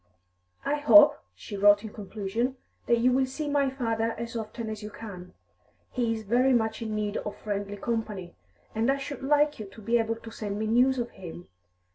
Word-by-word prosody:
"I 295 - +1
hope," 295 0 +7 0.2
she 95 - -8
wrote 205 +1 +5
in 220 - -7
conclusion, 220 +5 -3 0.3
"that 235 - +4
you 245 +2 +3
will 260 +1 +2
see 295 +3 -4
my 285 -1 +2
father 230 -3 -1
as 235 +1 -5
often 225 0 -5
as 215 0 -5
you 210 - -6
can; 185 -5 -10 0.6
he 240 -3 0
is 220 -1 -3
very 245 +5 +3
much 220 -1 +1
in 220 -2 -3
need 210 0 -1
of 210 - -5
friendly 205 -1 -4
company, 210 -5 -3 0.4
and 225 +4 +2
I 275 - 0
should 275 -1 -6
like 295 +1 +2
you 215 - -6
to 195 - -14
be 230 +3 +2
able 225 0 0
to 225 0 -11
send 205 -2 -4
me 215 - -1
news 250 +4 +3
of 240 -1 -2
him. 175 -1 -10
225 Hz, 200 wpm, -28 LUFS, 210-255 Hz, 0.6 s, hope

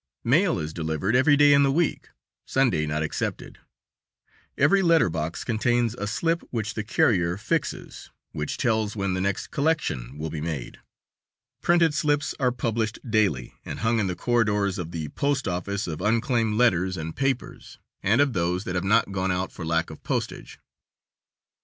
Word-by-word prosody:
Mail 165 - +3
is 80 -1 -4
delivered 80 +6 -1
every 145 +3 +5
day 145 0 +6
in 140 - +5
the 140 -1 +3
week, 165 +3 0 0.4
Sunday 115 - +1
not 75 +1 -1
excepted. 75 - -4 1.0
Every 155 +8 +4
letter 165 - +4
box 80 +1 -3
contains 120 0 +1
a 105 -4 -4
slip 165 +10 0
which 110 -3 -3
the 110 - -3
carrier 90 -5 +2
fixes, 105 - -3 0.2
which 75 -1 -4
tells 110 -5 0
when 100 -2 -1
the 90 - -1
next 100 0 -2
collection 140 - -1
will 80 +1 -4
be 75 -1 -4
made. 80 -6 -5 0.8
Printed 170 -3 +3
slips 150 -1 0
are 125 -2 +2
published 115 -2 -2
daily, 100 - +1
and - - -6
hung 115 +1 +2
in 100 - +1
the 90 - -2
corridors 105 -5 +1
of 85 -2 -4
the 80 -3 -5
post 140 -2 -1
office, 100 +3 -2
of 85 -1 -5
unclaimed 115 +1 +1
letters 95 -6 +2
and 80 0 -5
papers, 135 -2 -3 0.2
and 110 +8 +3
of 140 -3 +2
those 90 +1 0
that 90 - -4
have 90 - -1
not 105 +1 +2
gone 95 -1 -1
out 90 +1 -2
for 90 - -8
lack 80 0 0
of 80 - -11
postage. - - -4
105 Hz, 170 wpm, -25 LUFS, 85-125 Hz, 1.0 s, day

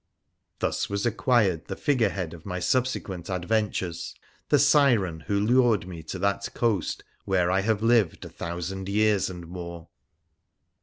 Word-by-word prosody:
Thus - - -1
was 100 +1 -2
acquired 110 -7 +2
the 95 - -4
figure 125 -5 +2
head 90 -4 -4
of 85 -1 -11
my 90 -2 -4
subsequent 95 -4 -1
ad 90 -2 -3
ventures 105 -5 -1 0.2
— - - -36
the 145 - +5
Siren 125 - +4
who 100 -1 +1
lured 115 -3 +3
me 85 -3 -7
to 80 - -6
that 100 0 -1
coast 110 -8 0 0.2
where 90 -2 +2
I 95 +1 +2
have 110 +1 0
lived 115 -6 +2
a - - -8
thousand 90 +3 -5
years 105 -1 +2
and 90 -2 -8
more. 85 -1 -8
95 Hz, 160 wpm, -26 LUFS, 90-110 Hz, 0.2 s, the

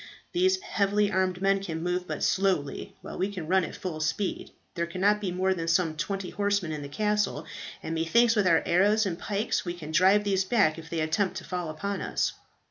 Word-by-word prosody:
These 375 +1 +2
heavily 205 - +1
armed 185 0 0
men 195 0 +3
can 165 -4 -4
move 180 0 -1
but - - -4
slowly; 185 -8 0
while - - -7
we 195 +2 0
can 180 -5 -5
run 190 +1 +3
at - - -5
full 170 -4 -5
speed. 155 +6 -2 0.2
There 170 -1 -2
cannot 200 +5 +1
be 190 -3 -2
more 190 +1 +1
than 165 -2 -4
some 165 -1 +2
twenty 185 +4 -3
horsemen 200 -4 0
in 150 -1 -4
the 140 - -7
castle; 210 -3 0 0.4
and 160 - -3
methinks 230 +9 +3
with 205 -3 +3
our 165 -2 +4
arrows 205 +5 +3
and 175 -3 -3
pikes 210 +1 -1
we 175 -1 -4
can 160 -3 -8
drive 190 +5 +5
these 195 -2 +1
back 190 -6 +2
if 160 0 -11
they 165 -1 -2
attempt 180 +4 0
to 180 - -6
fall 180 -3 -4
upon 200 +6 -3
us." - - -1
185 Hz, 215 wpm, -28 LUFS, 165-200 Hz, 0.4 s, drive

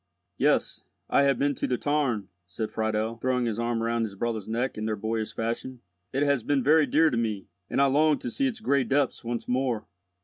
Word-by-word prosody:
"Yes, - - +2 0.3
I 140 - +5
have 140 -1 +3
been 145 +1 +1
to - - -2
the 125 - 0
tarn," 135 -9 0 0.2
said 110 +5 -4
Friedel, 110 +1 -1
throwing 125 +1 0
his 115 -1 -2
arm 115 -1 -1
round 115 0 0
his 105 -3 -4
brother's 110 0 -3
neck 120 +4 -1
in 110 0 -3
their 110 - 0
boyish 110 +1 -2
fashion. 120 +2 -3 0.3
"It 135 +2 +1
has 140 -3 +2
been 140 +2 +1
very 150 +2 +5
dear 160 +1 +4
to 120 - -1
me, 110 -4 -2 0.2
and - - 0
I 140 - +6
longed 145 +1 +3
to 120 - -4
see 275 - +1
its 225 -4 -4
gray 140 -9 +2
depths 140 0 0
once 120 0 -4
more." 125 -4 0
120 Hz, 215 wpm, -27 LUFS, 110-140 Hz, 0.3 s, I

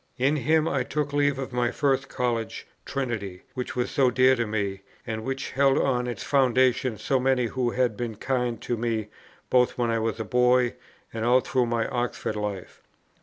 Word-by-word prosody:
In 135 +4 +2
him 155 +4 +2
I 140 -4 0
took 145 +2 -2
leave 145 -1 +2
of 135 -2 -5
my 120 -1 +1
first 135 0 0
College, 120 -3 -2 0.2
Trinity, 110 -9 -3
which 125 -1 -4
was 125 -1 -1
so 135 -2 +3
dear 130 +1 +4
to 120 -2 -1
me, 100 -2 -2 0.2
and 110 -1 -4
which 135 +2 -4
held 135 0 +3
on 125 -2 +1
its 120 -4 -4
foundation 130 -3 +2
so 135 +4 0
many 130 -1 +2
who 125 +1 -1
had 125 -2 0
been 115 -1 -4
kind 125 0 -1
to 120 - -1
me 110 -2 -2 0.4
both 125 -1 +3
when 120 -2 +1
I 115 - +1
was 115 0 -2
a 110 - -3
boy, 125 +1 +3 0.4
and 110 -1 -3
all 125 +2 +4
through 125 -1 0
my 115 -1 0
Oxford 120 -3 -2
life. 105 -3 -5
125 Hz, 190 wpm, -26 LUFS, 115-130 Hz, 0.4 s, dear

